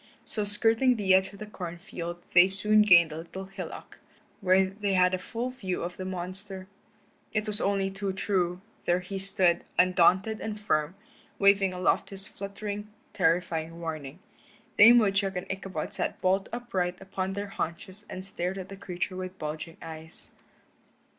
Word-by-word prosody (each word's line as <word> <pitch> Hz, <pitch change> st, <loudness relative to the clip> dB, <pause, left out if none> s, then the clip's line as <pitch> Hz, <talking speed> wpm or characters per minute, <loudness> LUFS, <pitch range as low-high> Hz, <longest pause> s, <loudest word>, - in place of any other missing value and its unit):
So 210 Hz, -2 st, -3 dB
skirting 225 Hz, +5 st, +3 dB
the 195 Hz, -4 st, +3 dB
edge 190 Hz, 0 st, +4 dB
of 200 Hz, -, -12 dB
the 215 Hz, -, -7 dB
corn 180 Hz, -5 st, -7 dB
field 175 Hz, 0 st, -7 dB
they 175 Hz, +1 st, +8 dB
soon 210 Hz, +2 st, +3 dB
gained 170 Hz, -6 st, +7 dB
a 155 Hz, -, -6 dB
little 180 Hz, +4 st, -7 dB
hillock, 195 Hz, 0 st, -8 dB, 0.4 s
where 190 Hz, -1 st, +4 dB
they 200 Hz, +1 st, -2 dB
had 180 Hz, 0 st, +4 dB
a 185 Hz, -, 0 dB
full 235 Hz, +6 st, -4 dB
view 195 Hz, -10 st, -3 dB
of 175 Hz, +1 st, -5 dB
the 185 Hz, -, -5 dB
monster. 185 Hz, +1 st, -6 dB, 0.7 s
It 210 Hz, 0 st, 0 dB
was 210 Hz, -1 st, -1 dB
only 195 Hz, -1 st, +1 dB
too 195 Hz, 0 st, -3 dB
true; 185 Hz, -2 st, 0 dB, 0.2 s
there 175 Hz, +1 st, +2 dB
he 195 Hz, +2 st, -5 dB
stood, 190 Hz, -3 st, +2 dB
undaunted 185 Hz, +4 st, +4 dB
and 215 Hz, -1 st, -4 dB
firm, 155 Hz, -4 st, 0 dB, 0.4 s
waving 200 Hz, -1 st, +4 dB
aloft 180 Hz, 0 st, +1 dB
his 195 Hz, 0 st, -7 dB
fluttering, 205 Hz, +1 st, -6 dB, 0.3 s
terrifying 165 Hz, -1 st, 0 dB
warning. 155 Hz, -3 st, -5 dB, 0.6 s
Dame 230 Hz, +4 st, +9 dB
Woodchuck 200 Hz, -3 st, +2 dB
and 180 Hz, +1 st, -3 dB
Ichabod 190 Hz, -4 st, -4 dB
sat -, -, -2 dB
bolt 190 Hz, +1 st, +1 dB
upright 190 Hz, -7 st, -2 dB
upon 190 Hz, 0 st, -3 dB
their 200 Hz, +1 st, -4 dB
haunches 190 Hz, +3 st, -5 dB
and 185 Hz, 0 st, -4 dB
stared 190 Hz, 0 st, -3 dB
at 190 Hz, -1 st, -7 dB
the 195 Hz, -, -7 dB
creature 185 Hz, -1 st, -4 dB
with 185 Hz, 0 st, -6 dB
bulging 155 Hz, +1 st, -5 dB
eyes. 160 Hz, 0 st, -4 dB
190 Hz, 165 wpm, -28 LUFS, 180-200 Hz, 0.7 s, Dame